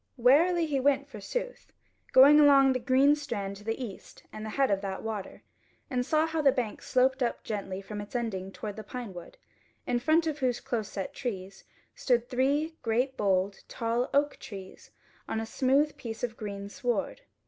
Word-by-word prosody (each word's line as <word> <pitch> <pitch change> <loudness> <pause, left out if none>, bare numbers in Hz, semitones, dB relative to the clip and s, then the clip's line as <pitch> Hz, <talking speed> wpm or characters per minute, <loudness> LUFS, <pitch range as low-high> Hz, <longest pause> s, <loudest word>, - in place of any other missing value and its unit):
Warily 325 +8 +4
he 290 -3 0
went 280 +1 +2
forsooth, - - -6 0.4
going 280 +3 +8
along 275 -2 +6
the 255 - -1
green 265 +4 +4
strand 205 -9 -4
to 205 - -14
the 225 +3 -3
east 230 -7 -9
and 215 - -7
the 215 - -5
head 270 +3 +1
of 195 -1 +1
that 195 -1 -5
water, 220 -3 -5 0.5
and 250 -1 +1
saw 310 +4 +2
how 320 -1 -1
the 280 -2 +5
bank 250 -5 -3
sloped 260 +1 +2
up 240 - -1
gently 195 -3 -4
from 210 +1 -6
its 205 +4 -11
ending 195 -6 -3
toward 210 +1 -7
the 220 - -6
pine 240 -5 -7
wood, 175 -1 -11 0.5
in 245 -1 0
front 315 +6 +3
of 310 -2 -2
whose 250 -3 0
close 220 -4 -3
set 195 -2 -5
trees 195 -6 -6 0.3
stood 240 -2 +1
three 280 +6 +1
great 250 +3 0
boled 195 -2 +1
tall 235 +2 -1
oak 285 +1 +2
trees 195 -3 -10 0.4
on 220 - -1
a 225 - -3
smooth 275 +6 +2
piece 225 -1 -7
of 235 -2 -2
green 200 -3 -6
sward. 240 - -2
245 Hz, 185 wpm, -29 LUFS, 210-275 Hz, 0.5 s, going